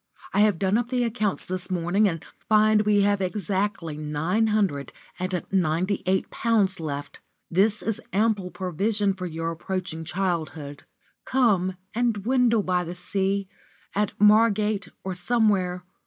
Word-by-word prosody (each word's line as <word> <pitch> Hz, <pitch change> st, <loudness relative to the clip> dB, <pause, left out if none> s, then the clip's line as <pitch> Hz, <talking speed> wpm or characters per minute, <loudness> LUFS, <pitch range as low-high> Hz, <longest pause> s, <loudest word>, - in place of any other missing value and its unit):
I -, -, +2 dB
have 210 Hz, -4 st, +4 dB
done 195 Hz, +5 st, +2 dB
up 240 Hz, 0 st, -3 dB
the 250 Hz, -1 st, +1 dB
accounts 215 Hz, -4 st, -1 dB
this 185 Hz, 0 st, -4 dB
morning, 185 Hz, +4 st, +2 dB
and 165 Hz, -3 st, -6 dB, 0.2 s
find 215 Hz, 0 st, +5 dB
we 205 Hz, -1 st, +4 dB
have 200 Hz, 0 st, +2 dB
exactly 190 Hz, -3 st, -2 dB
nine 160 Hz, +9 st, 0 dB
hundred 195 Hz, -10 st, 0 dB, 0.3 s
and 185 Hz, -1 st, -2 dB
ninety 185 Hz, +1 st, +1 dB
eight 190 Hz, 0 st, +1 dB
pounds 205 Hz, -5 st, +1 dB
left. 145 Hz, -3 st, -5 dB, 0.3 s
This 205 Hz, +4 st, +2 dB
is 225 Hz, +1 st, -2 dB
ample 205 Hz, -2 st, +1 dB
provision 195 Hz, +3 st, 0 dB
for 185 Hz, -1 st, -5 dB
your 165 Hz, 0 st, -3 dB
approaching 175 Hz, -1 st, -4 dB
childhood. 160 Hz, -5 st, -3 dB, 0.4 s
Come 200 Hz, -8 st, +2 dB, 0.2 s
and 240 Hz, 0 st, +1 dB
dwindle 230 Hz, +1 st, +2 dB
by 180 Hz, -1 st, +1 dB
the 175 Hz, +1 st, -6 dB
sea 195 Hz, +2 st, -1 dB, 0.5 s
at 205 Hz, -1 st, -1 dB
Margate 210 Hz, -1 st, +4 dB, 0.2 s
or 190 Hz, -, -3 dB
somewhere. 180 Hz, -2 st, +1 dB
195 Hz, 140 wpm, -25 LUFS, 180-215 Hz, 0.5 s, find